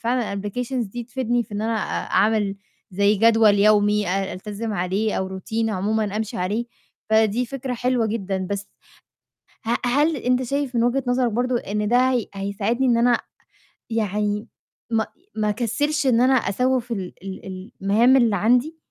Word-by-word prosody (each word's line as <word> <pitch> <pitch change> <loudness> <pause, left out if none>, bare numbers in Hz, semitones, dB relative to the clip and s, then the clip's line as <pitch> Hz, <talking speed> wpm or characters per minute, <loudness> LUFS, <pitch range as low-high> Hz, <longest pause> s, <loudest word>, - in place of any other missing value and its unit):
فعلًا 235 -3 -1
الApplications 230 +3 -3
دي 240 +3 -5
تفيدني 245 -1 -1
في 215 - -11
إن 205 - -2
أنا 225 +1 0
أ 210 - -3
أعمل 210 -2 +2 0.3
زي 200 +2 +3
جدول 225 0 +5
يومي 210 0 +3
أ 195 +1 -1
ألتزم 210 +3 -5
عليه 195 +3 -1
أو 190 0 -4
Routine 225 +3 -2
عمومًا 210 +1 -1
أمشي 215 -1 -3
عليه، 205 +6 -1 0.5
فدي 220 +2 +3
فكرة 260 0 -4
حلوة 245 -1 +1
جدًا، 195 -4 -2
بس 200 0 -3 1.0
ه 235 +2 +2
هل 295 +6 +2
أنت 250 -1 +1
شايف 275 +1 -2
من 230 - +3
وجهة 250 +3 +1
نظرك 245 -1 +1
برضو 245 +2 0
إن 210 -2 -2
ده 250 +3 +4
هي 245 -4 0
هيساعدني 200 +6 -1
إن 240 - +3
أنا 240 +1 +3 0.7
يعني 210 -1 -1 0.4
ما 225 -2 0 0.3
ما 215 -1 0
أكسّلش 250 +7 0
إن 240 -2 +4
أنا 260 +1 +4
أسوّف 250 +2 0
ال 190 -5 -4
ال 195 -1 -7
ال 190 0 -8
المهام 225 +7 +4
اللي 235 -5 +3
عندي؟ 245 - +2
225 Hz, 165 wpm, -23 LUFS, 205-245 Hz, 1.0 s, جدول